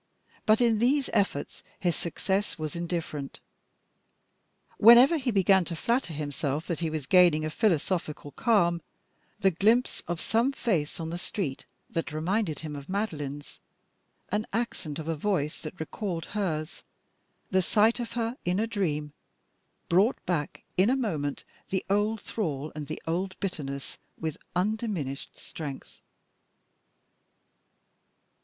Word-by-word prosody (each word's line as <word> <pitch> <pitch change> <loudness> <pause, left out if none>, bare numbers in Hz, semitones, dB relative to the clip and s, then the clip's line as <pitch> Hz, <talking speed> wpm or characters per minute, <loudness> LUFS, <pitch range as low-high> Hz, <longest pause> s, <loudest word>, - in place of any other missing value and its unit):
But 220 +2 +5
in 230 -3 +4
these 270 +4 +2
efforts 200 -9 0 0.2
his 175 -2 +1
success 190 +4 -1
was 155 +1 -4
indifferent. 165 -5 -3 1.4
Whenever 240 +8 +9
he 265 -4 -1
began 195 -3 +5
to 170 - -4
flatter 235 +3 0
himself 145 0 -2
that 170 -3 -2
he 165 -2 0
was 155 -3 -3
gaining 170 -2 +5
a 155 - -2
philosophical 165 -5 0
calm, 175 - +3 0.6
the 195 - +5
glimpse 220 +8 +2
of 175 -1 -2
some 235 +8 +2
face 175 - -1
on 160 0 -4
the 175 - -3
street 145 -9 -3 0.2
that 165 -1 -3
reminded 160 +1 -1
him 155 -2 -5
of 140 +2 -8
Madeline's, 150 -8 -3 0.7
an 210 +2 -1
accent 200 -9 -2
of 160 -1 -6
a 165 - +1
voice 155 -2 -1
that 160 +3 -8
recalled 170 +1 -3
hers, 170 -5 -2 0.7
the 190 -1 +4
sight 220 +6 +3
of 235 -1 -4
her 230 0 -1
in 180 +2 +1
a 220 - +2
dream, 155 -10 -1 0.7
brought 195 +8 +3
back 165 -5 -2
in 190 +5 +5
a 260 - +4
moment 155 - -2 0.3
the 190 - -1
old 210 +2 +2
thrall 155 -8 -3
and 150 -2 -6
the 155 - -5
old 185 +3 -2
bitterness 140 -8 -4 0.2
with 160 -2 -2 0.2
undiminished 185 - -2
strength. 145 -4 -8
175 Hz, 135 wpm, -28 LUFS, 155-215 Hz, 1.4 s, Whenever